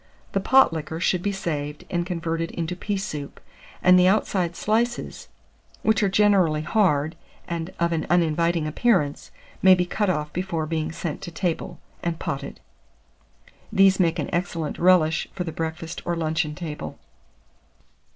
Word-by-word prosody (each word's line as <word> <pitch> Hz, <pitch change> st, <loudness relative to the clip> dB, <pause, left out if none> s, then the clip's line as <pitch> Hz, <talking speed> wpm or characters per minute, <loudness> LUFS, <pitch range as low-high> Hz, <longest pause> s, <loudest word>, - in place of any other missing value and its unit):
The 195 Hz, -, +1 dB
pot 265 Hz, 0 st, +5 dB
liquor 160 Hz, 0 st, -4 dB
should 180 Hz, 0 st, +1 dB
be 205 Hz, -, 0 dB
saved, 150 Hz, -6 st, -4 dB
and 175 Hz, -1 st, -1 dB
converted 165 Hz, -2 st, -2 dB
into 170 Hz, +1 st, -3 dB
pea 200 Hz, +3 st, -2 dB
soup; 150 Hz, -8 st, -5 dB, 0.4 s
and 180 Hz, 0 st, +7 dB
the 180 Hz, -, +5 dB
outside 185 Hz, -3 st, +1 dB
slices, 235 Hz, +4 st, -1 dB, 0.6 s
which 220 Hz, +1 st, +3 dB
are 200 Hz, -, +3 dB
generally 190 Hz, -6 st, +3 dB
hard, 160 Hz, -6 st, +1 dB, 0.3 s
and 170 Hz, 0 st, -3 dB
of 170 Hz, 0 st, +1 dB
an 160 Hz, -2 st, -1 dB
uninviting 170 Hz, -1 st, +2 dB
appearance, 155 Hz, -3 st, +1 dB, 0.3 s
may 190 Hz, -1 st, +8 dB
be 180 Hz, -1 st, 0 dB
out 205 Hz, -2 st, +3 dB
off 150 Hz, -4 st, -2 dB
before 175 Hz, -3 st, -2 dB
being 160 Hz, 0 st, -2 dB
sent 160 Hz, -2 st, -5 dB
to 175 Hz, -, -7 dB
table, 170 Hz, 0 st, -3 dB, 0.2 s
and 170 Hz, -1 st, -2 dB
potted. 135 Hz, -, -5 dB, 1.1 s
These 195 Hz, 0 st, +5 dB
make 170 Hz, -1 st, +2 dB
an 150 Hz, -, -3 dB
excellent 170 Hz, -3 st, -2 dB
relish 170 Hz, -3 st, +4 dB
for 180 Hz, -, -3 dB
the 165 Hz, -, -4 dB
breakfast 160 Hz, +1 st, -5 dB
or 175 Hz, -, -1 dB
luncheon 160 Hz, -1 st, -1 dB
table. 150 Hz, -, -6 dB
170 Hz, 150 wpm, -24 LUFS, 160-185 Hz, 1.1 s, may